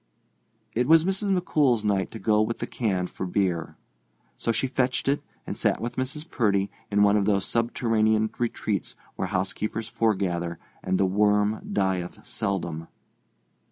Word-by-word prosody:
It 125 +3 +1
was 160 +1 +6
Mrs. 195 0 +1
McCool's 135 -10 +2
night 100 -2 +1
to - - -8
go 105 -1 +2
with 110 +2 0
the - - -3
can 95 -7 -1
for 95 - -5
beer. 90 -3 -1 0.6
So 115 - -1
she 115 - 0
fetched 130 -1 0
it 140 +1 +2 0.2
and - - -4
sat - - +1
with 120 - -4
Mrs. 145 +5 -3
Purdy 100 - +1 0.2
in 105 0 +3
one 100 0 +5
of 100 - +1
those 100 -2 +2
subterranean 110 -2 +2
retreats 110 -4 -2 0.2
where 95 - -2
house 95 0 -1
keepers 110 +1 -3
foregather 95 -7 0 0.2
and 95 0 0
the 95 - +4
worm 105 +2 +2
dieth 95 -3 -1
seldom. 85 -4 -2
105 Hz, 160 wpm, -26 LUFS, 95-120 Hz, 0.6 s, was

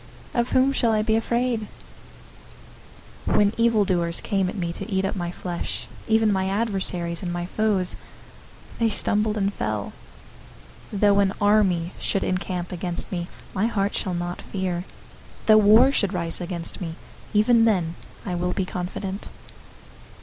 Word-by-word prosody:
Of 240 0 0
whom 265 +1 +3
shall 230 -4 +2
I 215 0 +1
be 220 0 +1
afraid? 235 -1 0 1.6
027:002 - - +1
When 205 0 +3
evil 230 -2 +3
doers 170 -2 +1
came 195 -3 0
at - - -6
me 170 -2 -2
to 215 - -7
eat 190 0 +1
up 195 - -2
my 175 -2 -3
flesh, 175 -1 -4 0.2
even 220 -1 +3
my 190 0 0
adversaries 190 -5 0
and 180 -3 -3
my 175 0 -3
foes, 195 -1 0 0.8
they 230 -1 +3
stumbled 210 0 +3
and 200 0 0
fell. 105 - -3 1.0
027:003 200 - -4
Though 200 -1 +5
an 195 -1 +2
army 190 -5 +2
should 195 - 0
encamp 180 -1 -3
against 175 -1 +1
me, 175 -2 -3 0.3
my 205 +3 +1
heart 200 -3 -1
shall 185 -2 0
not 175 0 -4
fear. 185 -2 -3 0.6
Though 215 -1 +7
war 220 +6 +6
should 200 -7 +3
rise 170 0 -1
against 175 0 -2
me, 165 -2 -5 0.4
even 225 +2 +5
then 180 -7 +1 0.3
I 185 - -3
will 180 +1 -1
be 190 - -1
confident. 190 +2 -5
195 Hz, 155 wpm, -24 LUFS, 175-215 Hz, 1.6 s, Though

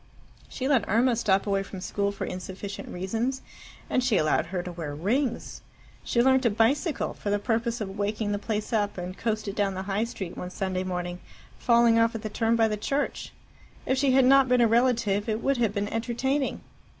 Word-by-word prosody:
She 260 - -3
let 265 -7 +2
Irma 235 +4 +3
stop 195 -4 +2
away 200 -1 +1
from 195 -1 -8
school 200 +2 -1
for 200 - -5
insufficient 190 +2 -6
reasons, 225 +9 -2 0.4
and 255 - +1
she 240 -5 +2
allowed 155 0 +2
her 180 0 -3
to 180 - -6
wear 160 -4 -5
rings. 230 - -1 0.4
She 235 - +2
learnt 265 0 +4
to 240 - +3
bicycle, 265 - +1
for 205 - -5
the 205 - +2
purpose 230 +2 -1
of 195 0 -5
waking 205 +1 -1
the 205 - -1
place 215 +2 -3
up, 205 -2 0
and 180 +1 -5
coasted 215 -2 -2
down 195 -2 0
the 190 - -4
High 200 +3 -1
Street 195 -6 -6
one 180 - -5
Sunday 185 0 -2
evening, 180 -1 -3 0.4
falling 235 -1 +4
off 230 +1 +2
at 225 - -5
the 215 - -3
turn 225 +2 +1
by 225 -1 +4
the 210 -1 -2
church. 275 +7 -2 0.5
If 260 - +1
she 270 0 +2
had 265 -1 +5
not 270 0 +6
been 250 -1 +4
a 235 - +6
relative, 230 -3 +2
it 220 +1 -2
would 275 -1 +2
have 230 -4 +2
been 205 0 -1
entertaining. 245 +5 -1
220 Hz, 205 wpm, -27 LUFS, 195-240 Hz, 0.5 s, not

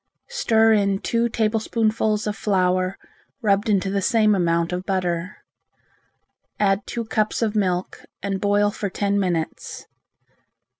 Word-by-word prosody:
Stir 225 - +3
in 200 -2 +2
two 235 +3 0
tablespoonfuls 220 -1 0
of 210 -1 -2
flour 185 -2 +1 0.5
rubbed 205 0 +2
into 195 -2 +1
the 200 0 0
same 215 +1 +3
amount 170 -2 +1
of 180 +1 -3
butter. 180 -1 -2 1.2
Add 200 -1 +1
two 235 -1 -4
cups 215 +1 0
of 220 -1 -1
milk 185 -3 -1 0.2
and 195 -1 -2
boil 205 0 +2
for 205 -1 -4
ten 200 +1 0
minutes. 175 -4 -3
200 Hz, 130 wpm, -22 LUFS, 185-215 Hz, 1.2 s, Stir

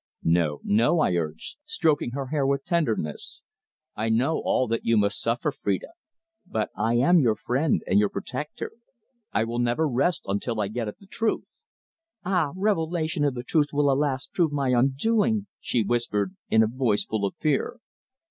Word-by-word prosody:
"No, 80 -3 +1
no," 115 +11 +3
I 120 - +2
urged, 80 - -4
stroking 165 - +1
her 135 0 -3
hair 150 -1 0
with 140 0 0
tenderness. 115 - -2 0.5
"I 110 +2 -1
know 130 +8 +2
all 130 - +1
that 115 +1 -1
you 115 -1 +3
must 100 0 +1
suffer, 115 +1 0
Phrida, 100 - -2 0.5
but 110 - -3
I 110 +3 +1
am 170 +9 +5
your 115 -7 +3
friend 135 +7 0
and 95 - +3
your 105 -1 +3
protector. 150 +4 -5 0.6
I 110 - +1
will 115 +1 -3
never 120 +6 +1
rest 140 +6 +1
until 105 +4 -2
I 100 -2 0
get 115 +1 -3
at 105 - -6
the 200 - -18
truth." 220 +3 -1 0.8
"Ah! 180 -6 +1
Revelation 165 -6 0
of 140 -3 +1
the 120 - -4
truth 150 +2 +2
will, 145 -1 +3
alas! 135 -1 0
prove 170 -4 0
my 140 -2 0
undoing!" 200 - +2
she 120 - 0
whispered, 105 -3 -1
in 110 0 +5
a - - +2
voice 115 -3 0
full 110 -2 -2
of 100 - -1
fear. 155 - -1
130 Hz, 175 wpm, -26 LUFS, 110-155 Hz, 0.8 s, am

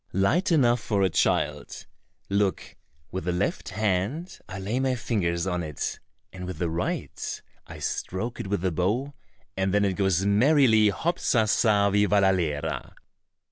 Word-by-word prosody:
"Light 155 - +2
enough 125 -6 +4
for 100 -4 0
a 95 - +2
child. - - 0 0.4
Look, 100 -1 -1 0.4
with 95 -2 -4
the 90 - 0
left 90 +3 -2
hand 110 - -2
I 95 - -6
lay 100 +6 -2
my 130 -1 +1
fingers 90 -8 -1
on 90 -2 -1
it, 75 -4 -4 0.3
and 90 -1 -7
with 90 -3 -5
the 85 0 -1
right 85 +2 -3 0.3
I - - -9
stroke 115 +6 -4
it - - -4
with 100 -2 -1
the 95 0 0
bow, 105 - -1 0.4
and 95 0 0
then 105 0 +3
it 95 - +1
goes 95 -1 +1
merrily, 110 0 +5
hop 170 - -1
sa 115 -3 +2
sa 105 -2 +3
vivallalera!" 95 -7 +1
100 Hz, 155 wpm, -26 LUFS, 90-115 Hz, 0.4 s, merrily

